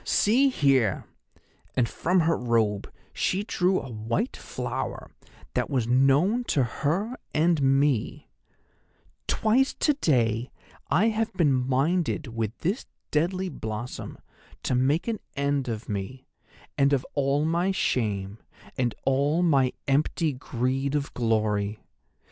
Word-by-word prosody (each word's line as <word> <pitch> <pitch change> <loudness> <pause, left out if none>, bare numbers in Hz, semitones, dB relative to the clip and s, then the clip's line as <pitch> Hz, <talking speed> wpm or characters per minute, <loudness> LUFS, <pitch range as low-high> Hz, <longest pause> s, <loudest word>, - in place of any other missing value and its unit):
See 255 +7 +3
here,'—and 130 - -1
from 180 +8 +1
her 165 +1 +2
robe 115 -4 0 0.2
she 190 +3 0
drew 185 -2 +1
a 135 - -8
white 115 - -2
flower - - -5 0.4
that - - -1
was 130 -5 0
known 135 - +3
to 140 - +2
her 170 - -1 0.2
and 160 0 +3
me—'twice 140 - -1
to 300 - +2
day 120 - +1 0.4
have 220 +4 +2
I - - -18
been 155 -6 +4
minded 135 +4 0
with 110 0 -2
this 195 +10 -1 0.2
deadly 185 +5 0
blossom 110 -4 -6 0.5
to - - 0
make 135 - +2
an 225 -3 -1 0.2
end 140 -1 0
of 115 -1 -4
me, 105 +5 -5 0.5
and 140 +1 +4
of 130 -2 +1
all 140 +1 +1
my 170 +4 +1
shame, 105 - -1 0.4
and 120 -2 0
all 140 +5 +2
my 135 -7 +3 0.2
empty 150 +2 +1
greed 130 +1 -2
of 145 -1 -2
glory. 110 -3 0
140 Hz, 120 wpm, -26 LUFS, 120-170 Hz, 0.5 s, been